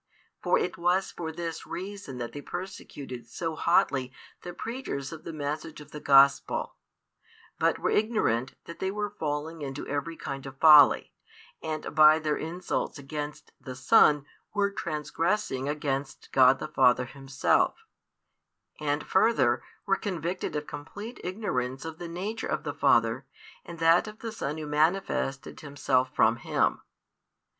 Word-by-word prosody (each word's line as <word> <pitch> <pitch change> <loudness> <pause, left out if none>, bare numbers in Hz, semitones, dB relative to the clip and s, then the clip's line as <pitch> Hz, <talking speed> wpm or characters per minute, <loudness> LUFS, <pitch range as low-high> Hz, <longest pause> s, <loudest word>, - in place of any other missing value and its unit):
For - - +3
it 435 - -2
was 180 +3 +1
for 160 -2 -5
this 165 0 -5
reason 195 -8 -6
that 120 -1 -5
they 145 - -7
persecuted 140 -9 -7
so 160 +7 -4
hotly 130 -4 +2 0.3
the 175 - -7
preachers 225 - -5
of 160 -1 -10
the - - -5
message 155 +1 -4
of 150 - -13
the 150 - -7
Gospel, 140 -1 +4 0.9
but - - +2
were - - -1
ignorant 170 - +1
that 170 - -10
they 190 - -1
were 205 +1 -3
falling 155 -2 -4
into 135 0 -5
every 145 +3 -3
kind 135 0 -6
of 135 0 -10
folly, 150 -2 +7 0.5
and 155 -1 -4
by 155 0 +7
their 155 -2 -1
insults 170 0 -3
against 145 +1 -6
the 130 -1 -7
Son 145 - +5 0.3
were 200 0 +2
transgressing 165 -3 -2
against 140 -2 -3
God 130 0 +6
the 155 - -5
Father 125 -3 +3
Himself, 135 - 0 0.9
and 145 0 -1
further, 130 - +3 0.2
were 195 - +3
convicted 180 -4 -3
of 150 0 -2
complete 205 +13 -8
ignorance 135 - -3
of 160 0 -7
the 175 - -5
Nature 200 +7 -4
of - - -2
the 145 - -3
Father 120 -2 +2 0.4
and 170 - -9
that 165 +4 +4
of 215 0 -9
the 225 0 -6
Son 150 -8 -4
Who 155 - -5
manifested 150 -2 0
Himself 135 -3 0
from 115 +2 +4
Him. 120 - 0
150 Hz, 150 wpm, -28 LUFS, 135-175 Hz, 0.9 s, folly